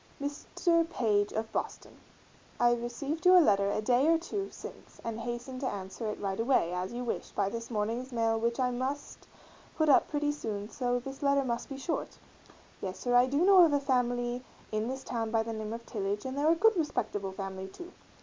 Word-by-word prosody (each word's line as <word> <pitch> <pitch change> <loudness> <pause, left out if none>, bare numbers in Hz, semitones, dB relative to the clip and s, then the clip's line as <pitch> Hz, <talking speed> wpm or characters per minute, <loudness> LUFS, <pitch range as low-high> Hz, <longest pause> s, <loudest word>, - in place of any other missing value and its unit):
MR. 330 +4 0
PAGE 210 -9 +1
of 220 0 -3
Boston: - - -5 0.6
I 240 0 +5
rec. 240 +7 -3
your 365 0 +8
letter 200 - +4
a 215 - -1
Day 250 +5 +3
or 330 0 +5
two 390 +4 -4
since - - -11
and 230 -1 -4
hasten 240 +2 -5
to 265 - -1
ans. 190 -2 -6
it 215 -2 -3
right 195 0 -2
away, 225 -8 +2
as 180 +1 -3
you 245 +1 -4
wish, 240 - -3
by 195 - 0
this 230 +2 -6
morning's 230 +4 -2
mail 225 -1 +1
which 235 +2 0
I 250 -1 +2
must 260 +4 -4 0.5
put 315 -1 +2
up 275 - +6
pretty 295 -1 0
soon 210 -8 -4
so 245 -2 0
this 270 +2 -7
letter 280 -1 +3
must 235 -1 -2
be 275 - -6
short. 300 +5 -3 0.6
Yes 190 -1 -4
sir 245 - -1
I 245 +1 +6
do 285 +6 +2
know 385 -2 +8
a 285 - +3
family 245 -2 0 0.3
in 215 +1 -1
this 265 +1 -4
town 225 -2 -2
by 220 0 +2
the 225 0 -4
name 215 -1 -4
of 230 +1 -6
Tillage 205 0 -3
and 260 0 -3
they're 290 +2 +2
a - - +4
good 445 +5 +4
respectable 205 - -2
family 190 -1 -5
too. 350 - -10
245 Hz, 205 wpm, -30 LUFS, 220-280 Hz, 0.6 s, your